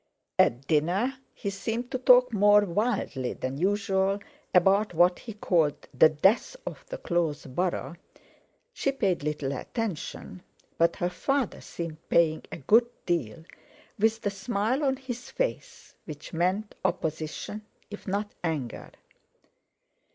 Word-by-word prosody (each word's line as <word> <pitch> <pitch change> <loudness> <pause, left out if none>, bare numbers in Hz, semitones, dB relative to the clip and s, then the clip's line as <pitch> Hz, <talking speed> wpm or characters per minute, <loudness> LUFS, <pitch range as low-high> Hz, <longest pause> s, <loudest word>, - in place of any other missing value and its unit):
At 125 +3 +3
dinner 180 - +1
he 200 - -4
seemed 230 +5 -3
to 255 - -1
talk 250 -1 +6
more 205 0 +6
wildly 170 - -1
than 130 +2 -4
usual 195 +1 +1 0.3
about 195 +2 +4
what 175 +2 +4
he 225 - -8
called 170 -7 +1
"the 145 +5 +7
death 195 - +2
of - - -6
the - - -5
close 170 -4 -1
borough"—she 175 - -5
paid 195 -9 0
little 150 -2 -2
attention, 185 - -5 0.4
but 170 0 +4
her 175 - -1
father 270 +5 -1
seemed 165 -2 -6
paying 160 -2 +3
a - - -5
good 230 - +4 0.2
deal, 160 -6 -1 0.6
with 220 +1 +2
the 205 - -1
smile 210 +7 -1
on 265 -1 +2
his 250 -2 -7
face - - -4
which 150 0 -9
meant 185 +5 0
opposition, 160 +3 -2 0.3
if 205 - -9
not 205 +2 -2
anger. 150 -8 -3
190 Hz, 130 wpm, -28 LUFS, 160-225 Hz, 0.6 s, the